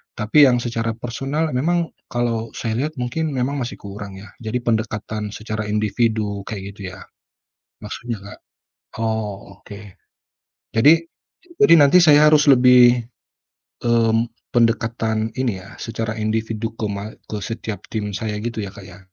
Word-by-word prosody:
Tapi 115 +8 +5
yang 125 -2 +2
secara 115 -1 -2
personal 135 +7 -2
memang 165 +6 0 0.2
kalau 115 -2 -2
saya 115 -1 -2
lihat 155 - -5
mungkin 150 +5 -2
memang 135 +2 -1
masih 125 0 -4
kurang 100 0 -8
ya, 95 +1 -11
jadi 120 +2 -3
pendekatan 110 -2 -2
secara 110 -1 -4
individu 105 -1 0
kayak 100 -2 -6
gitu 95 -2 -7
ya, - - -13 0.8
maksudnya 110 0 -5
Kak? 100 - -11 0.6
Oh, 105 -3 -4
oke. 100 0 -10 1.0
Jadi 150 +9 +6 0.6
jadi 210 -5 +7
nanti 150 +4 +6
saya 150 -2 +7
harus 150 -1 +5
lebih, 125 -2 +6 0.8
mmm, 115 -1 +3 0.2
pendekatan 115 -1 +1
ini 120 -7 0
ya 95 - -13
secara 115 -1 -3
individu 110 +1 -2
ke 110 - -2
ma 100 +1 -5 0.2
ke 105 - -2
setiap 115 -1 -5
tim 105 -2 -3
saya 105 +2 -3
gitu 115 -1 -4
ya 100 -2 -5
Kak 100 - -10
ya? 95 +1 -13
115 Hz, 145 wpm, -21 LUFS, 105-125 Hz, 1.0 s, jadi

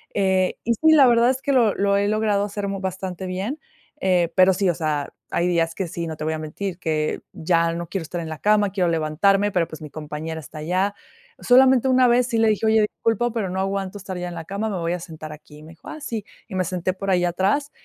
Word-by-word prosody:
Eh, 190 -2 +1
y 235 - +2
sí, 315 +8 +4
la 290 -4 +7
verdad 235 0 +4
es 260 0 -1
que, 280 - 0
lo 235 -6 +3
lo 200 0 +2
he 200 0 +1
logrado 210 -1 +1
hacer 205 0 -4
mu 195 0 -3
bastante 185 -1 -4
bien. 195 +11 -3 0.4
Eh, 180 -3 +2
pero 185 0 +6
sí, 195 +1 0
o - - +2
sea, 155 -3 -2 0.2
hay 170 - +1
días 165 -2 +1
que 190 - -3
sí, 170 0 -5
no 160 -1 -6
te 155 - -5
voy 160 - 0
a 155 - -4
mentir, 175 +4 -5
que 155 -3 -1
ya 165 0 +1
no 170 0 -5
quiero 195 +2 -3
estar 175 +2 -5
en 160 - -6
la 155 -1 -6
cama, 210 -1 +3
quiero 185 -3 +1
levantarme, 175 +6 +2
pero, 175 -4 +1
pues, 155 - -10
mi 150 - -8
compañera 155 +1 -6
está 155 - -12
allá. 185 +6 0 0.4
Solamente 260 0 +5
una 255 -1 +5
vez 240 0 +3
sí 235 -3 -1
le 225 0 +4
dije: 215 +1 0
"Oye, 220 0 +4
disculpa, 225 +2 0
pero 220 -4 -2
no 185 +1 -3
aguanto 195 0 -3
estar 190 -1 -6
ya 180 0 -4
en - - -7
la 165 - -6
cama, 200 +5 -3
me 200 - -3
voy 170 0 -1
a 180 - -3
sentar 155 -2 -9
aquí". 150 0 -14
Y - - -14
me 160 - -12
dijo: 160 - -17
"Ah, 310 - -8
sí", 225 -7 -4 0.2
y - - -6
me 185 - +1
senté 185 +1 -2
por 195 +1 -3
ahí 180 -1 +2
atrás. 195 +12 0
190 Hz, 260 wpm, -23 LUFS, 165-210 Hz, 0.4 s, la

